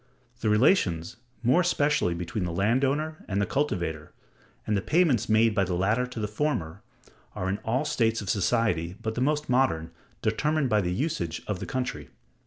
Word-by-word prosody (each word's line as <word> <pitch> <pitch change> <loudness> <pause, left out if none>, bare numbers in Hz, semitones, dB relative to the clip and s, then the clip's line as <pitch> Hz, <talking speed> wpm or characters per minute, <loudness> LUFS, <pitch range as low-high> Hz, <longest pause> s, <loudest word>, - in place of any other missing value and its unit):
The 110 - 0
relations, 105 - +2 0.3
more 130 +9 +4
especially 150 - +1
between 90 +3 -3
the 90 - -2
land 110 +10 +1
owner 155 +3 -1
and 100 0 -1
the 100 - +2
cultivator, 85 - -2 0.5
and 105 - 0
the 100 - +1
payments 155 - +2
made 110 0 +4
by 100 -2 +2
the 90 -1 -1
latter 105 +8 +1
to 125 -2 -7
the 105 - -1
former, 105 - -2 0.5
are, 95 - -3
in 100 +2 -1
all 120 +7 -1
states 115 -7 +1
of 100 - -6
society 90 -3 +1
but 110 - -3
the 120 - -3
most 150 +2 +1
modern, 120 -11 +1 0.3
determined 145 +4 +1
by 105 -1 +4
the 90 -2 -2
usage 90 - -2
of 105 -4 -3
the - - -6
country. 75 - -3
110 Hz, 185 wpm, -27 LUFS, 90-135 Hz, 0.5 s, more